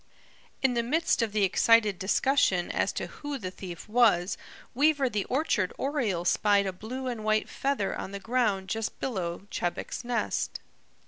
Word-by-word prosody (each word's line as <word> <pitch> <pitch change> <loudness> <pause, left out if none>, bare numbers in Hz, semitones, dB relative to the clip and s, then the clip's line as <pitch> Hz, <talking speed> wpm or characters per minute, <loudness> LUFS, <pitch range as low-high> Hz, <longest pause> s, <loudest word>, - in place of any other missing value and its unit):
In 265 -2 +4
the 235 - +1
midst 300 +4 +1
of 225 -2 0
the 210 -1 +1
excited 210 +1 +4
discussion 190 -3 +2
as - - 0
to - - -3
who 290 -1 -6
the 185 -7 -5
thief 180 -1 -8
was, 210 -6 +3 0.4
Weaver 280 0 +3
the 205 -1 -1
Orchard 250 - 0
Oriole 235 - -1
spied 205 +2 +3
a 190 - -2
blue 240 +8 -6
and 240 -4 -3
white 215 0 +1
feather 270 -8 -1
on - - -5
the 200 - -5
ground 215 -3 0
just 220 +2 -3
below 185 -7 -3
Chebec's 175 +6 -3
nest. 240 0 -1
215 Hz, 165 wpm, -28 LUFS, 190-255 Hz, 0.4 s, In